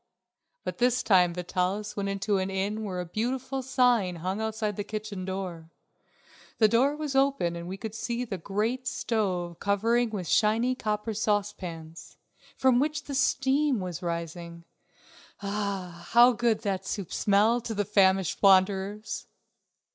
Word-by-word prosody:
But - - -5
this 250 0 +2
time 180 -4 +4
Vitalis 185 +4 -2
went 200 -1 -2
into 195 0 0
an 190 +1 -2
inn 200 +3 -2
where 185 -4 -4
a 180 - -3
beautiful 260 +8 -2
sign 245 -8 +2
hung 185 +5 -3
outside 220 -1 -2
the 205 - -3
kitchen 210 -3 -5
door. 185 -4 -5 0.9
The 220 - +5
door 255 +7 +3
was 300 -2 -4
open 270 -11 +2
and 170 0 -6
we 190 +2 -5
could 220 +1 -6
see 235 +2 -3
the 195 -5 -5
great 220 +8 -2
stove 185 -8 -2
covered 225 +4 +1
with 190 -5 -4
shining 225 +4 +2
copper 215 -1 -2
saucepans, 195 -6 -3 0.4
from 260 -2 +4
which 295 +1 -1
the 285 - -7
steam 270 0 +2
was 180 -3 -5
rising. 170 0 -5 0.8
Ah, 200 -4 -4
how 240 +2 +7
good 235 -2 +1
that 195 -3 -2
soup 190 -2 -5
smelled 215 +4 +3
to 225 - -3
the 205 0 0
famished 190 -3 +2
wanderers! 195 +2 +2
205 Hz, 145 wpm, -28 LUFS, 185-235 Hz, 0.9 s, how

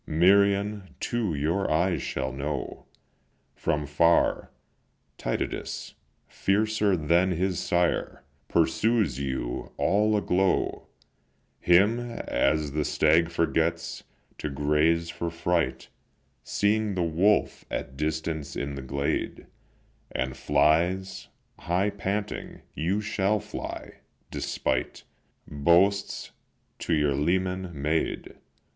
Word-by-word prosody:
Merion 100 +3 +3
too 110 -9 -1
your 80 +7 0
eyes 85 +3 +1
shall 65 0 -3
know 70 0 -4 0.7
From 75 0 -1
far. 85 +4 +2 0.7
Tydides, - - -3 0.3
fiercer 105 -1 +1
than 85 +4 +2
his 90 +1 -1
sire, 85 -5 0 0.2
Pursues 85 - +2
you, 65 -3 -3
all 105 +3 +2
aglow; 95 -1 0 0.7
Him, 100 +7 +4
as 75 - -1
the 75 +1 0
stag 80 +3 +3
forgets 85 0 -1 0.4
to 75 - -3
graze 75 +4 +1
for 85 0 -3
fright, 85 +1 -1 0.5
Seeing 105 0 +1
the 90 - +1
wolf 90 +6 +2
at 65 - -4
distance 80 0 -3
in 70 0 -3
the 70 - -5
glade, 70 +2 -2 0.7
And 65 0 -2
flies, 85 +8 +1 0.3
high 95 +4 0
panting, 100 +1 -4
you 95 +6 -1
shall 105 0 0
fly, 105 - -7 0.3
despite 65 - -2 0.4
Boasts 85 +7 +2 0.5
to 85 - 0
your 75 -2 +2
leman 90 +5 0
made. 75 +3 -1
85 Hz, 100 wpm, -27 LUFS, 75-100 Hz, 0.7 s, Him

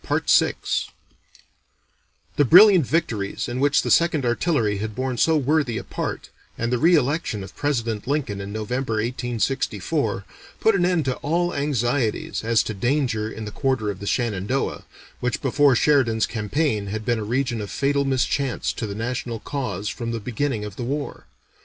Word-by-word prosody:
The 145 - +5
brilliant 180 - +7
victories 115 -12 -1
in 120 +1 -3
which 145 +1 +3
the - - -1
Second 165 -5 +3
Artillery 120 - +1
had 110 0 -4
borne 130 0 -2
so 160 -1 +4
worthy 145 -4 +1
a - - -4
part, - - -5 0.3
and 115 +2 -1
the 125 - +1
re 170 +6 +5
election 145 -7 0
of 95 - -11
President 115 -7 -2
Lincoln 130 -9 -1
in 100 +1 -6
November 115 +3 -2
(1864), 120 +1 -1 0.3
put 220 - +4
an 180 -3 +2
end 175 -5 +1
to 130 -1 -1
all 175 +4 0
anxieties 130 -6 -1
as 115 0 +3
to 110 - -4
danger 120 0 0
in 110 - -7
the 105 - -6
quarter 130 -4 0
of 95 - -9
the 100 - -7
Shenandoah, 120 +2 -1 0.3
which 125 0 -1
before 140 0 +3
Sheridan's 120 -5 +3
campaign 110 0 -1
had 110 +2 -4
been 120 -2 +1
a - - -3
region 120 +1 -1
of 100 - -6
fatal 140 0 +1
mischance 135 0 0
to 110 - -4
the 100 - -5
national 120 +1 -3
cause 125 -9 -4
from 115 +2 -4
the 115 -1 -2
beginning 120 0 -2
of 105 -2 -9
the - - -4
war. 140 +4 -4
125 Hz, 165 wpm, -23 LUFS, 110-145 Hz, 0.3 s, brilliant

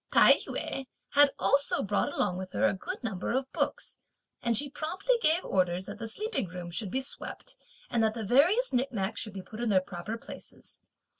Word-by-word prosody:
Tai - - +8
yü 270 -1 -3 0.2
had 290 0 +6
also 280 0 +2
brought 205 0 0
along 185 -3 0
with 185 0 -7
her - - +2
a - - +3
good 345 - -6
number 205 -4 -2
of 265 +1 -2
books, - - -2 0.4
and 235 -2 +3
she 290 - +4
promptly 325 - -1
gave 330 +1 +4
orders 180 -1 0
that - - -8
the 230 - -4
sleeping 420 - -2
rooms 175 0 -8
should 205 +1 -2
be 260 +8 -1
swept, 270 - -6 0.3
and 235 - 0
that 220 0 +1
the 225 -2 -4
various 335 - +4
nicknacks 230 -5 -1
should 215 - -6
be 190 -1 -7
put 215 - -10
in 240 - 0
their 195 -3 +5
proper 185 +4 -6
places. - - -12
230 Hz, 200 wpm, -29 LUFS, 190-280 Hz, 0.4 s, Tai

